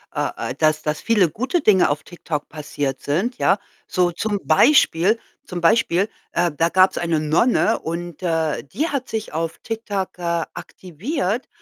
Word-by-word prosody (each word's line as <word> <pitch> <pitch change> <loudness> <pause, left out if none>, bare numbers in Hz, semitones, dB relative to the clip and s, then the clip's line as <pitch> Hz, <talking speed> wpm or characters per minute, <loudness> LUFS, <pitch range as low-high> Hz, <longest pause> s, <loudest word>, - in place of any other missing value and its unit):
äh, - - 0 0.2
äh, - - -6
dass 155 +1 +2
dass 155 0 -2
viele 205 -7 +3
gute 260 - -1
Dinge 195 -4 +4
auf 145 - -2
TikTok 160 -4 -5
passiert 145 -3 -4
sind, 195 - -1
ja. 195 - +3 0.3
So 180 -1 +1
zum 205 +4 -2
Beispiel, 215 - +4 0.3
zum 180 -1 -5
Beispiel, 200 0 +3 0.2
äh, 175 0 +1
da 165 +3 +2
gab's 185 +2 +4
eine 170 -2 0
Nonne 210 +9 +2
und, 170 +1 -6
äh, 160 -3 0
die 295 - -2
hat 275 -3 -3
sich 220 -5 -4
auf 165 +1 -3
TikTok, 210 -5 -4
äh, 170 -1 -1
aktiviert, 190 - -4
175 Hz, 160 wpm, -21 LUFS, 160-215 Hz, 0.3 s, Dinge